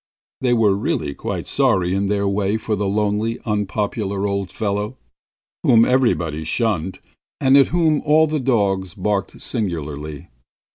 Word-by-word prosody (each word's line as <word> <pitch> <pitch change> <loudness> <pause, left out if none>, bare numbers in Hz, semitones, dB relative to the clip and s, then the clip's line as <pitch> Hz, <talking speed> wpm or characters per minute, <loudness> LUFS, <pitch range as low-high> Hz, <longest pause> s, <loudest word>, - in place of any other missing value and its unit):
They 125 -2 +1
were 110 -4 +3
really 85 -7 -2
quite - - -4
sorry 90 -1 +2
in 100 +1 0
their 100 0 0
way 100 +1 0
for 110 -1 -2
the 100 0 -1
lonely, 105 +3 0
unpopular 105 -1 -2
old 100 -2 -2
fellow, 105 +4 -3 0.6
whom 115 0 +5
everybody 85 - +1
shunned, 95 0 -1 0.4
and 135 0 +4
at 140 -1 +6
whom 160 -3 +2
all 155 +1 +4
the 155 -1 -1
dogs 100 -8 0
barked 100 -2 -2
singularly. 75 - -4
105 Hz, 140 wpm, -20 LUFS, 95-115 Hz, 0.6 s, at